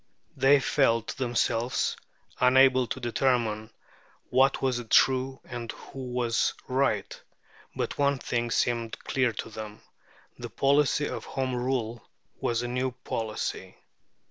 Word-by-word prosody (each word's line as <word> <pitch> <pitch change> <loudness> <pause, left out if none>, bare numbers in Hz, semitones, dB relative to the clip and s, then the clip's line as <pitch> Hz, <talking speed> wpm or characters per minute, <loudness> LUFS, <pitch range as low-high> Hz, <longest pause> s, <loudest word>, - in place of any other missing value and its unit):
They 140 +1 +5
felt 115 -5 +2
themselves 120 -1 0 0.4
unable 130 0 +5
to - - -4
determine 115 -3 0 0.6
what 135 +2 +4
was 125 -2 0
true 130 0 +3
and 120 -2 -6
who 135 - -12
was 120 -2 +1
right. 135 +2 0 0.5
But - - -3
one 140 -1 +3
thing 120 -2 -2
seemed 115 -1 0
clear 125 -3 +1
to 110 - -6
them. 110 -1 -8 0.6
The - - -6
policy 145 +1 +2
of - - -5
Home 130 -1 -2
Rule 120 -2 -2 0.4
was 120 0 0
a - - -2
new 125 +1 -1
policy. 110 -1 -4
125 Hz, 120 wpm, -27 LUFS, 115-135 Hz, 0.6 s, They